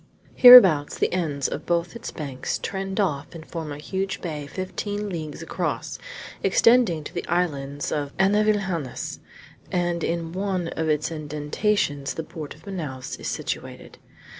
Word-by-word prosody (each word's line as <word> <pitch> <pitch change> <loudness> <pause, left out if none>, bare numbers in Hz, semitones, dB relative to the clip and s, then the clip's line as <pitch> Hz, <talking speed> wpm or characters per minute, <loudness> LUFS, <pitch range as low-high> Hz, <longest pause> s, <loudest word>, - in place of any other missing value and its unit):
Hereabouts 190 - +9
the - - 0
ends 150 -6 -1
of - - -6
both 170 +3 0
its 235 - -6
banks 140 -5 -4
trend 195 0 -4
off 155 -5 -1
and 160 -1 -9
form 160 -3 -6
a 145 - -5
huge 190 +5 -3
bay 150 -4 -5
fifteen 205 +4 -4
leagues 155 -5 -5
across, - - -3 0.4
extending 230 -10 +4
to - - -9
the - - -4
islands 145 -5 -1
of 145 -2 -2
Anavilhanas; 195 -7 0 0.5
and 175 -1 0
in 165 -1 -2
one 185 -3 -1
of 160 -1 -2
its 155 +1 0
indentations 150 0 -1
the 160 - -3
port 155 -3 -8
of 155 - -20
Manaos 150 -10 -5
is - - -5
situated. - - -5
170 Hz, 145 wpm, -24 LUFS, 150-190 Hz, 0.5 s, Hereabouts